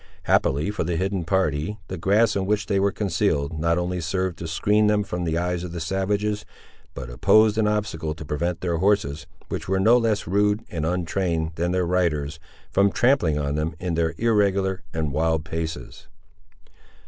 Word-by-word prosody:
Happily, 75 +9 +2
for 105 - -2
the 85 +1 -2
hidden 95 0 -1
party, 95 +1 0
the 95 - -5
grass 100 +5 +2
in 95 -1 -1
which 105 -1 +1
they 100 -1 +1
were 100 +1 +2
concealed, 85 -6 -1
not 85 +2 +1
only 90 0 -2
served 90 +1 -2
to 85 - -5
skreen 105 +6 +2
them 105 -1 +2
from 90 -3 -4
the 80 0 0
eyes 90 0 -1
of 90 -1 -6
the 85 - -4
savages, 100 +5 -1 0.5
but 65 -2 -6
opposed 110 - +4
an 105 - +3
obstacle 105 -8 -2
to 80 - -9
prevent 85 +4 -2
their 85 -2 -1
horses, 95 -6 +1 0.2
which - - -4
were 95 0 +2
no 115 +5 +5
less 110 -3 0
rude 105 +4 +1
and 80 -2 -2
untrained 85 -2 -1
than 85 +2 -1
their 90 -1 +1
riders, 80 -4 0 0.3
from 100 +1 +3
trampling 120 - +2
on 70 -1 -1
them, 75 +3 -2
in 90 -2 -2
their 80 0 0
irregular 100 -5 +1
and 80 -3 -2
wild 80 0 0
paces. 80 -6 -5
90 Hz, 185 wpm, -24 LUFS, 80-100 Hz, 0.5 s, no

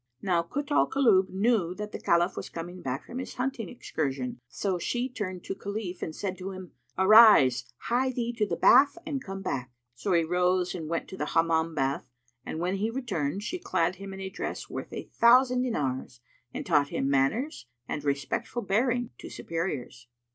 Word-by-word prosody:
Now 175 -3 +2
Kut 280 - -5
al - - +3
Kulub 215 -9 +4
knew 195 -3 +1
that 210 +1 -6
the - - -6
Caliph 170 +2 +2
was - - -6
come 175 +2 -7
back 130 0 -4
from 250 - -6
his 260 - -6
hunting 250 -2 -3
excursion; 135 - -3
so 185 +7 -2
she 245 +7 -1
turned 185 -8 -5
to - - -4
Khalif 200 -2 -5
and 155 - -4
said 190 -2 -4
to 185 +1 -5
him, 185 -2 -9 0.3
"Arise; 190 - +7 0.2
hie 255 +2 +1
thee 240 -1 -2
to 210 - +2
the - - -1
bath 280 +5 +6
and 280 -4 -3
come 195 0 -6
back." 130 -8 -3 0.2
So 125 +11 -2
he 170 -1 +4
rose 180 +2 +1
and 160 -4 -5
went 165 0 -2
to 190 - -8
the 150 - -2
Hammam 165 0 +2
bath, 135 -2 -1 0.3
and - - -5
when 180 +3 -1
he 210 +3 0
returned, 200 - -2
she 360 +12 -3
clad 175 - 0
him 195 +1 -8
in 190 - -8
a 190 - -4
dress - - -5
worth - - -6
a - - -5
thousand 250 +1 +4
dinars 130 - -2 0.3
and - - -5
taught 145 -1 +3
him 135 - -1
manners 140 - 0 0.2
and 150 - -4
respectful 140 - -2
bearing 245 +4 +1
to - - -8
superiors. 150 -7 -4
185 Hz, 190 wpm, -28 LUFS, 160-235 Hz, 0.3 s, Arise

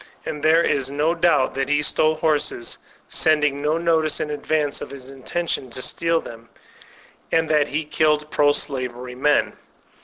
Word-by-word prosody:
And 150 - -5
there 160 +2 +4
is 135 -4 0
no 150 +4 +1
doubt 165 -6 +2
that 135 0 -2
he 150 0 +2
stole 155 +1 +2
horses, 155 -6 -1 0.3
sending 150 -3 +1
no 150 +2 +1
notice 165 -2 +1
in 150 - -3
advance 150 0 -1
of - - -6
his 135 -2 -10
intention 135 +1 -3
to 130 +2 -5
steal 165 0 0
them, 115 -3 -11 0.8
and 160 0 +2
that 150 -2 +3
he 155 +2 -3
killed 150 0 +1
pro 145 -1 +4
slavery 125 -3 -4
men. 145 +4 +1
150 Hz, 160 wpm, -22 LUFS, 135-155 Hz, 0.8 s, there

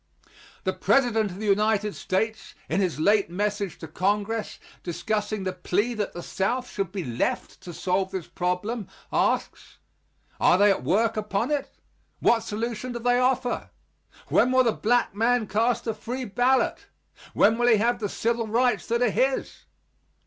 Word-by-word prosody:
The - - 0
President 230 -6 +2
of 180 - -9
the 215 - -5
United 210 0 +2
States, 220 +4 -2
in 180 +5 0
his 180 -5 -1
late 200 +4 +3
message 205 +1 -2
to 160 - -8
Congress, 205 +6 -1 0.2
discussing 210 +3 -2
the 185 -1 -2
plea 200 +6 -1
that 210 -3 -3
the 175 - -7
South 245 +6 -1
should 195 -3 -3
be 195 -2 -4
left 120 -4 -2
to 175 - -8
solve 185 +2 -1
this 190 -4 -5
problem, 185 +5 -2 0.3
asks: - - -1 0.6
"Are 180 - +5
they 205 +1 +5
at 195 - -1
work 220 +5 +1
upon 210 +4 -1
it? 290 -2 -1 0.5
What 235 - +4
solution 230 +3 -4
do - - -3
they 245 +1 +2
offer? 255 0 0 0.6
When 250 - +4
will 255 0 +5
the 235 - +3
black 240 +1 +1
man 230 +2 +2
cast 225 +4 0
a 225 - -1
free 245 +4 -5
ballot? 245 +5 +1 0.5
When 220 +3 +4
will 240 - +3
he 230 -3 +6
have 235 +3 +1
the 205 -3 -2
civil 230 +1 -1
rights 235 0 +1
that 235 +1 +1
are 240 - +2
his?" 265 +6 -1
215 Hz, 165 wpm, -25 LUFS, 195-240 Hz, 0.6 s, he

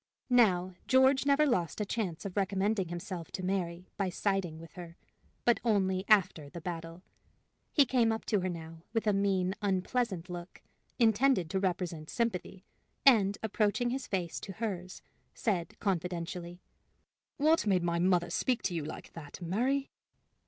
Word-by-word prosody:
Now, 185 -7 +4
George 265 +1 +4
never 285 +2 +5
lost 180 - 0
a 210 - 0
chance 195 -5 -3
of 195 - -5
recommending 195 0 +1
himself 175 0 -5
to 185 - -4
Mary 180 -2 -2
by 195 -2 0
siding 190 -3 -1
with 165 0 -11
her 170 -1 -10 0.5
but 240 - +4
only 190 -4 +1
after 185 -8 +3
the 170 - -8
battle. 165 +1 -6 0.7
He 285 - +5
came 240 -3 +3
up 225 - -3
to 210 - +1
her 185 0 -1
now 165 -1 -7
with 225 -1 0
a 210 - +3
mean, 195 -2 +1
unpleasant 195 -1 0
look, 175 0 -8 0.3
intended 225 -5 +3
to 190 - +1
represent 175 -4 -2
sympathy, 195 -4 -2 0.4
and, 205 -7 +6
approaching 220 +3 +1
his 265 +1 -3
face 180 -4 -2
to 195 - -7
hers, 185 -4 -5 0.3
said, 180 -7 -2
confidentially: 175 -1 -3 0.7
"What 310 -4 +3
made 185 -3 +3
my 170 0 0
mother 175 -1 +2
speak 250 -2 0
to 185 - -1
you 165 -3 -2
like 155 - -8
that, 150 -1 -9
Mary?" 245 +11 0
190 Hz, 155 wpm, -31 LUFS, 175-220 Hz, 0.7 s, and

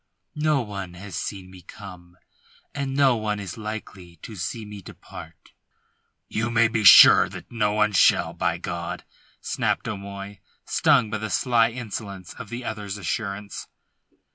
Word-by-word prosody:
"No 155 -3 +2
one 100 -4 -7
has 95 -1 -9
seen 95 -1 -5
me 95 -1 -13
come, 90 +1 -12 0.6
and 140 -1 -3
no 135 -3 +4
one 105 -2 -2
is 95 -4 -6
likely 105 -5 -8
to 110 - -8
see 110 +5 -5
me 105 -1 -9
depart." 80 -3 -13 0.8
"You 110 +2 -2
may 115 -1 +4
be 110 -1 -1
sure - - +9
that - - -11
no 105 -3 0
one 105 0 +2
shall, 95 - +3
by - - -1
God," - - -5 0.4
snapped - - -1
O'Moy, 100 0 -7 0.3
stung 110 - +3
by 110 - -2
the 110 0 -4
sly 115 +1 +2
insolence 105 -5 -7
of - - -8
the 120 +1 -6
other's 105 -2 -5
assurance. 100 +2 -4
105 Hz, 150 wpm, -24 LUFS, 95-115 Hz, 0.8 s, sure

